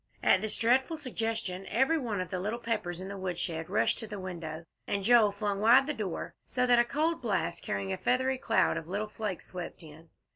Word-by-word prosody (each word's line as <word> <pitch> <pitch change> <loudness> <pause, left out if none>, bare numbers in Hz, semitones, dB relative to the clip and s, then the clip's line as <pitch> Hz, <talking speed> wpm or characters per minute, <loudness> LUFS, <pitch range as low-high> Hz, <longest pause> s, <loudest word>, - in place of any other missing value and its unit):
At 185 - +5
this 215 -1 0
dreadful 260 +7 +2
suggestion, 225 -8 -3
every 270 +8 +2
one 220 -8 -2
of 185 - -6
the 185 - -2
little 210 +5 -2
Peppers 225 -7 -3
in 190 - -6
the 200 0 -6
woodshed 175 -3 -3
rushed 115 +1 +2
to 225 - -6
the 205 -1 -6
window, 170 -3 -6 0.2
and 200 -1 -1
Joel 225 -1 +6
flung 200 0 -2
wide 240 +5 +6
the 300 - -2
door, 205 - -4
so 250 0 0
that 245 -1 +5
a - - +6
cold 310 +5 0
blast, 225 -5 -1
carrying 100 -1 -2
a - - -3
feathery 260 +1 +1
cloud 225 - +2
of 160 - -6
little 205 +4 -3
flakes, 210 -4 -4
swept 180 -2 -7
in. 160 +1 -14
210 Hz, 215 wpm, -30 LUFS, 180-240 Hz, 0.2 s, Joel